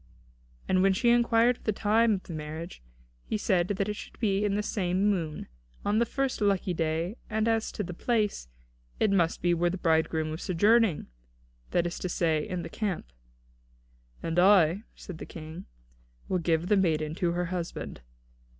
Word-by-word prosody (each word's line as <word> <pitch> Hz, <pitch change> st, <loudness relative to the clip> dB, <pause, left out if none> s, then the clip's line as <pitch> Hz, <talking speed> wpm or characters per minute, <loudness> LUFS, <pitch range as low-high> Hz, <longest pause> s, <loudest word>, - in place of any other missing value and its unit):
And 185 Hz, 0 st, +3 dB
when 195 Hz, 0 st, +4 dB
she 235 Hz, +5 st, +2 dB
inquired 240 Hz, 0 st, +4 dB
of -, -, -24 dB
the 215 Hz, -, +2 dB
time 220 Hz, +2 st, +3 dB
of 190 Hz, -, -7 dB
the 170 Hz, -, -8 dB
marriage, 155 Hz, -, -6 dB, 0.4 s
he -, -, -2 dB
said 185 Hz, -4 st, +1 dB
that 195 Hz, 0 st, -1 dB
it 210 Hz, -, -2 dB
should -, -, -10 dB
be 200 Hz, -3 st, +1 dB
in 205 Hz, -1 st, +1 dB
the 210 Hz, -, 0 dB
same 195 Hz, 0 st, +1 dB
moon, 160 Hz, -6 st, -3 dB, 0.4 s
on 205 Hz, +2 st, +2 dB
the 235 Hz, -, +2 dB
first 270 Hz, -4 st, -2 dB
lucky 195 Hz, -3 st, +1 dB
day; 165 Hz, +5 st, -1 dB
and 220 Hz, 0 st, 0 dB
as 225 Hz, -1 st, +1 dB
to 210 Hz, -, -4 dB
the 180 Hz, -, -6 dB
place, 210 Hz, -, -1 dB, 0.5 s
that -, -, +2 dB
it 210 Hz, -, +2 dB
must 175 Hz, -4 st, +1 dB
be 175 Hz, 0 st, +3 dB
where 175 Hz, +1 st, +2 dB
the 185 Hz, -, -3 dB
bridegroom 160 Hz, -2 st, +1 dB
was 160 Hz, -, -5 dB
sojourning, 205 Hz, 0 st, +3 dB, 0.6 s
that 175 Hz, -, +1 dB
is 175 Hz, -, -3 dB
to 185 Hz, -, -3 dB
say, 160 Hz, -3 st, 0 dB
in 180 Hz, -2 st, -3 dB
the -, -, -5 dB
camp. 180 Hz, -, -4 dB, 1.1 s
"And 165 Hz, +1 st, 0 dB
I," 190 Hz, +1 st, +5 dB
said 180 Hz, -5 st, -9 dB
the -, -, -6 dB
King, 160 Hz, 0 st, -9 dB, 0.6 s
"will 185 Hz, -, 0 dB
give 165 Hz, 0 st, +1 dB
the 205 Hz, +2 st, +3 dB
maiden 155 Hz, -5 st, +1 dB
to 170 Hz, -2 st, +2 dB
her 175 Hz, +1 st, -1 dB
husband." 175 Hz, -, -5 dB
185 Hz, 185 wpm, -28 LUFS, 165-210 Hz, 1.1 s, I